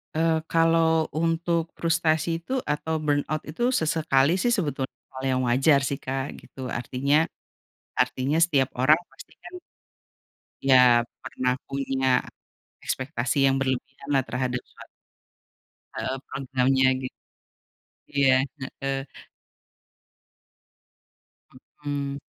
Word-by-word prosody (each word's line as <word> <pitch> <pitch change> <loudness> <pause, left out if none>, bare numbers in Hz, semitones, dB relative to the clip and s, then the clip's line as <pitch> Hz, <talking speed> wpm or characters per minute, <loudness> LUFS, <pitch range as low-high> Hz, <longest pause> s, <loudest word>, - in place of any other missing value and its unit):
Eee, 160 0 +2
kalau 165 -1 +3
untuk 165 +1 0
frustasi 165 0 +1
itu 255 +10 -4
atau 150 +2 -2
burnout 150 +1 0
itu 205 +11 -2
sesekali 160 0 +2
sih - - +1
sebetulnya 145 -7 -2 0.2
hal 130 0 -8
yang 130 0 +1
wajar 135 +4 +4
sih 135 +1 -2
Kak, 135 +1 -3
gitu. 130 -2 -8
Artinya 140 +6 +1 0.7
artinya 135 +4 +1
setiap 140 -6 +1
orang 150 +6 +5
pasti - - -15
kan - - -10 1.1
ya 125 -3 +6 0.2
pernah 125 0 -1
punya 135 -1 -1 0.8
ekspektasi 135 0 0
yang 135 - +3
berlebihan 135 +1 -3
lah 135 -2 +3
terhadap 125 -1 -2
suat - - -15 1.1
heeh, 130 - -3
programnya, 130 0 +1
git 130 - -6 1.0
iya, 135 -2 +5 0.4
heeh. 135 0 -1 2.8
Mhm. 140 -1 -3
140 Hz, 100 wpm, -25 LUFS, 130-160 Hz, 2.8 s, ya